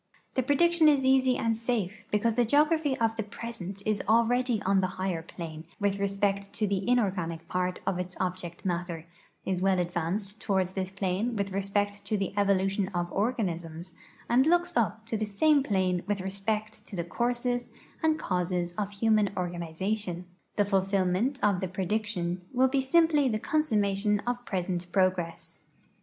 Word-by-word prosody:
Tlie 260 -1 0
prediction 340 +3 +4
is 280 -3 +3
easy 260 -1 +4
and 230 0 +1
safe 220 -3 -2
because 215 +2 +2
the 245 +2 +3
geography 295 +3 +3
of 225 -1 +1
the 225 - -1
l)resent 200 -3 -7
is 215 -2 +1
already 235 +1 +3
on 195 0 +3
the 185 - +1
higher 185 -3 -1
plane 160 -2 -8 0.2
with 200 -1 0
respect 200 0 0
to 210 - 0
the 200 -1 -1
inor 240 -6 +3
ganic 165 -3 -3
j)art 180 0 0
of 180 - 0
its 180 0 -5
object 180 0 -4
matter, 170 -2 -2 0.4
is 185 -1 -1
well 190 0 +3
advanced 180 +4 -2
toward 190 -3 +1
this 190 0 -3
plane 195 +4 -1
with 200 -1 -2
respect 200 +1 -1
to 210 +1 0
the 195 -1 -2
evolution 195 -1 +2
of 175 0 -1
organisms, 175 -6 -2 0.3
and 255 +4 +4
looks 350 0 +2
up 225 0 0
to 225 - -3
the 215 - -1
same 285 +9 +3
])lane 185 -3 +1
with 205 -1 0
respect 215 +3 -3
to - - -7
the 170 - -1
courses 245 +5 -1 0.3
and 315 -1 +3
causes 180 - -1
of 205 -1 -1
human 210 0 +2
organization; 175 +2 -3 0.3
the 205 - +3
fulfillment 195 +5 +1
of 200 -3 +3
the 190 - -2
prediction 185 -1 -2
will 260 +1 +4
be 270 +1 +1
simply 300 0 +4
the 215 - 0
consummation 210 -7 +1
'of 245 0 -2
present 180 -2 -2
progress. 185 -3 -1
200 Hz, 165 wpm, -28 LUFS, 185-230 Hz, 0.4 s, prediction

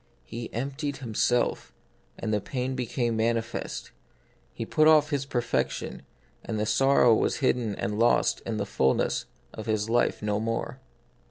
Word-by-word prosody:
He 115 - -7
emptied 140 +4 -3
Himself, 120 0 0 0.4
and 110 -1 -2
the 105 - +1
pain 130 +2 -3
be 125 -2 -3
came 120 -1 -1
manifest; 115 0 -2 0.6
He 115 - -5
put 155 +6 +3
off 155 -1 +5
His 140 -1 -1
perfection, 120 -3 -2 0.4
and 110 -2 -3
the 105 - 0
sorrow 125 +1 +4
was - - +1
hidden 120 -6 0
and 105 +2 -3
lost 120 +1 +3
in 115 -2 -3
the 100 - -1
fulness 65 -7 +1 0.3
of 110 - -8
His 110 0 0
life 120 -2 +1
no 105 0 0
more. 115 +3 -3
115 Hz, 155 wpm, -27 LUFS, 110-130 Hz, 0.6 s, off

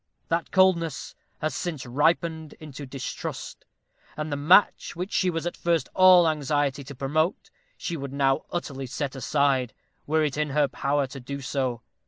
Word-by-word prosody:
That 165 0 0
coldness 175 -5 +2 0.3
has 155 - -1
since 155 -7 -4
ripened 160 +4 0
into 145 -2 -9
distrust; 130 0 -6 0.5
and 155 0 -3
the - - 0
match 165 +8 +4
which 180 +3 -5
she 185 - +2
was 165 -1 -3
at 175 - -3
first 170 -5 0
all 185 -2 +7
anxiety 145 -2 0
to 140 +1 -9
promote, 155 +7 -1 0.3
she 170 - -4
would 140 -3 -5
now 135 -1 +1
utterly 135 -6 -4
set 140 +2 -4
aside, 135 -1 +1 0.3
were 155 +1 +2
it 145 -2 -1
in 150 -1 0
her 145 +1 +2
power 140 +1 0
to 135 +1 -9
do 140 +3 -6
so. 130 -3 -2
145 Hz, 165 wpm, -26 LUFS, 135-165 Hz, 0.5 s, all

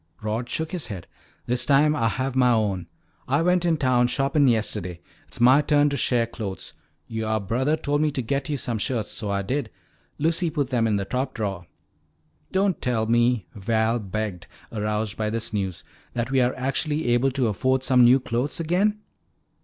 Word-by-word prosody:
Rod 110 +3 -2
shook 160 0 -3
his 180 -4 -3
head. 95 -7 -7 0.4
"This 125 0 +1
time 145 +3 +4
Ah 115 -6 +1
have 130 +5 -2
mah 125 -2 +4
own. 95 -5 -1 0.4
Ah 140 +5 +2
went 180 0 +2
in 165 -2 +2
town 125 -3 +3
shoppin' 135 +2 +2
yesterday. 105 -7 0 0.3
It's - - -6
mah 130 +4 +6
turn 145 0 +3
to - - -1
share 120 -4 +1
clothes. 110 -4 -6 0.3
Youah 110 -1 -1
brothah 130 +10 0
told 145 0 0
me 155 - +3
to 140 -3 -2
get 140 +4 -2
yo' 150 - 0
some 120 -4 -2
shirts. 115 0 -1
So 105 -2 -3
Ah 100 0 0
did. 135 +8 -2 0.5
Lucy 165 +3 +1
put 145 -4 -2
them 115 -3 +2
in 105 - +1
the 100 -1 -1
top 130 +4 -2
drawer." 95 -6 -3 0.8
"Don't 190 -1 +1
tell 115 -3 0
me," 120 -2 +2
Val 110 +3 0
begged, 105 -3 -4 0.2
aroused 105 -1 -2
by 110 -1 -1
this 115 0 -3
news, 95 -4 -2 0.3
"that 120 +1 -2
we 135 -1 +3
are 125 +1 +1
actually 145 +2 -1
able 120 +3 +3
to 130 -2 0
afford 130 +5 +1
some 125 -2 +5
new 125 +3 +6
clothes 125 +4 -2
again?" 195 +6 +1
125 Hz, 185 wpm, -24 LUFS, 110-140 Hz, 0.8 s, mah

